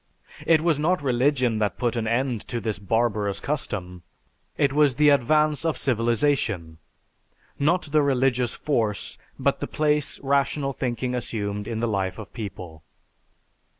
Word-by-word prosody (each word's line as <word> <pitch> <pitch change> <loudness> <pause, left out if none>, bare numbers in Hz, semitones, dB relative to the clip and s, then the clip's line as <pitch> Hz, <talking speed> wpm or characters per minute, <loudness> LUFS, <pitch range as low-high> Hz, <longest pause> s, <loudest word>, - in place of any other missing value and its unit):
It 160 -1 +5
was 160 -3 +1
not 165 +1 +1
religion 125 -3 +1
that 105 -1 -1
put 120 -1 0
an 115 -2 -1
end 120 -1 0
to 120 - -3
this 110 -2 -3
barbarous 105 -1 0
custom; 95 - -4 0.6
it 140 -1 +2
was 145 -3 +3
the 150 +2 +5
advance 150 +2 +3
of 160 -5 0
civilization; 115 - 0 0.8
not 170 +6 +2
the 155 0 +4
religious 130 -3 +1
force, 110 -8 -2 0.2
but - - 0
the - - -3
place 150 -1 0
rational 140 0 0
thinking 125 -1 -2
assumed 105 -4 -3
in 115 -1 -3
the 120 - +1
life 95 -3 -1
of 110 - -10
people. 90 -8 -7
125 Hz, 145 wpm, -24 LUFS, 110-145 Hz, 0.8 s, It